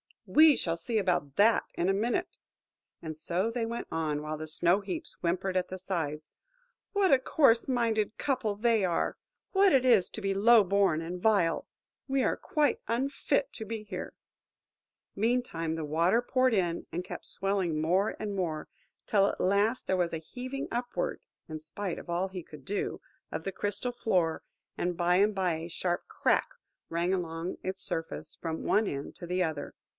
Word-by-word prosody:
–"We 310 -1 +7
shall 165 -6 -1
see 225 +6 -2
about 175 -8 0
that 220 +3 +4
in 175 - +1
a - - +4
minute." 240 - -1 0.6
And 160 -1 -5
so 180 +7 -1
they 230 -1 -1
went 235 +1 -4
on, 155 -2 -1
while 155 +1 -4
the 155 +1 -6
Snow 175 +4 +3
heaps 325 - -4
whimpered 185 +2 0
at 180 - 0
the 185 - -6
sides: 160 -5 -3 0.6
"What 400 -3 +3
a 265 - +6
coarse 255 -4 +3
minded 230 -4 0
couple 250 -7 0
they 225 -1 +2
are! 175 -2 0 0.3
What 390 -3 +5
it 260 -1 +4
is 225 -8 +5
to 220 - -6
be 195 -1 0
low 220 +3 +6
born 195 -4 +2
and 175 +2 -5
vile! 200 -6 +2 0.4
We 270 -1 +1
are - - +1
quite 295 -4 +1
unfit 275 - 0
to 220 - -6
be 220 0 -5
here!" 195 -3 -6 1.0
Meantime, 205 -8 0
the 160 - -3
water 170 +9 +3
poured 255 0 +2
in, 175 -4 0
and 175 +2 -2
kept 180 - -8
swelling 190 -5 -1
more 185 +6 +2
and 210 -2 -4
more; 165 -5 -2 0.4
till 200 -2 +4
at - - -3
last 205 +6 +2
there 190 - +1
was 175 -2 0
a - - 0
heaving 255 - -6
upward–in 245 - -4
spite 175 +4 -5
of - - -12
all 175 +3 0
he 185 -1 -6
could 150 -4 -13
do–of 200 +8 -5
the 195 - -2
crystal 205 +6 -2
floor; 185 -9 0 0.3
and 175 0 -1
by 175 0 +3
and 205 +2 +3
by 185 -3 +1
a 160 +1 -5
sharp 175 +1 -2
crack - - +1 0.4
rang 170 +3 0
along 170 -1 -3
its 190 +1 -4
surface, 165 0 -4
from 160 -1 -3
one 215 0 +2
end 140 0 -4
to 175 - -8
the 180 +1 +1
other. 160 -4 -4
195 Hz, 180 wpm, -30 LUFS, 170-230 Hz, 1.0 s, We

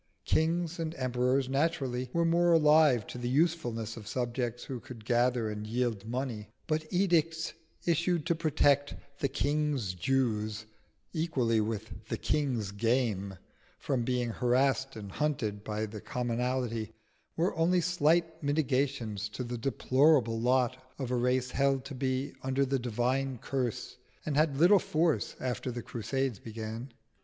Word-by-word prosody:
Kings 170 +1 +1
and 165 0 -3
emperors 130 0 +1
naturally 135 -3 0
were 170 +3 +2
more 170 +1 +4
alive 150 -7 +5
to 125 - -7
the 120 0 -2
usefulness 125 -7 0
of 105 -3 -10
subjects 120 0 -2
who 130 -2 -5
could 115 -3 -11
gather 120 -1 +2
and 105 0 -5
yield 115 -3 -1
money; 120 -4 -3 0.2
but 155 0 -2
edicts 165 -3 +1 0.3
issued 170 -1 +1
to - - +2
protect 145 -3 +2 0.2
"the 140 - +1
King's 145 -8 0
Jews" 110 0 0 0.5
equally 130 -10 +1
with 110 0 -5
the - - -1
King's 125 -9 0
game 100 -3 0 0.4
from 130 -4 -1
being 125 -1 0
harassed 135 +3 +1
and 100 -3 -7
hunted 110 -7 -1
by 110 0 -2
the 105 -1 -8
commonalty 120 -2 -2 0.4
were 170 +3 +1
only 175 +3 +3
slight 165 -1 +2
mitigations 135 -7 0
to 125 - -5
the 120 0 -4
deplorable 130 -2 +3
lot 130 +1 +2
of 130 -3 -4
a - - +2
race 125 +1 +1
held 135 -1 +1
to 140 - -7
be 130 +1 -1
under 135 +1 +1
the 135 0 0
divine 125 +3 -1
curse, 125 -1 -3 0.3
and 150 - -1
had 150 -2 +2
little 180 +6 +6
force 160 -1 0
after 130 0 -2
the 120 -1 -5
Crusades 130 -1 -2
began. 115 +3 -6
130 Hz, 145 wpm, -30 LUFS, 115-150 Hz, 0.5 s, little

